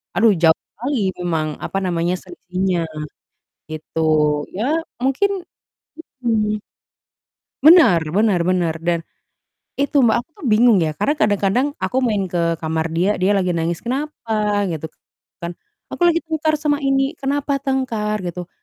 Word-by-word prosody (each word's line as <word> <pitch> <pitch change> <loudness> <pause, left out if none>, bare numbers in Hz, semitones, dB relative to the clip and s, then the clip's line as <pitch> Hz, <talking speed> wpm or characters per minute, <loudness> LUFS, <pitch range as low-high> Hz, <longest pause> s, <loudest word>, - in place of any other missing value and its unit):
aduh 225 -1 +5
jauh 160 -1 +5 0.2
sekali 230 -3 -1
memang, 165 -3 -1
apa - - -4
namanya, 175 -1 0
selisihnya, 185 - -2 0.9
gitu. 155 +1 -3 0.4
Iya 210 +5 -3 0.4
mungkin 360 +8 0 0.8
mhm, 215 -2 +1 1.0
Benar 295 - +7 0.2
benar 210 -4 +3
benar, 175 -3 +1
dan 170 0 +1 0.8
itu 285 +1 +1
Mbak, 220 -2 +4
aku 250 - -28
tuh - - -4
bingung 225 0 +5
ya, 155 - 0
karena 290 - +2
kadang-kadang 210 +2 +2
aku 255 - -2
main 210 -4 +1
ke 175 -1 -2 0.2
kamar 160 0 -1
dia, 180 +4 +2
dia 190 +2 +3
lagi 180 -2 +1
nangis, 165 0 -1
"Kenapa?" 275 -1 -4 0.4
Gitu 160 -2 -4 0.6
kan, 170 0 -4 0.4
"Aku - - -7
lagi 335 -1 +4
tengkar 315 -1 0
sama 295 -1 +1
ini," 270 0 +1
"Kenapa 280 +1 -1
tengkar?" 260 -6 -1
Gitu. 175 0 -5
210 Hz, 135 wpm, -20 LUFS, 175-270 Hz, 1.0 s, Benar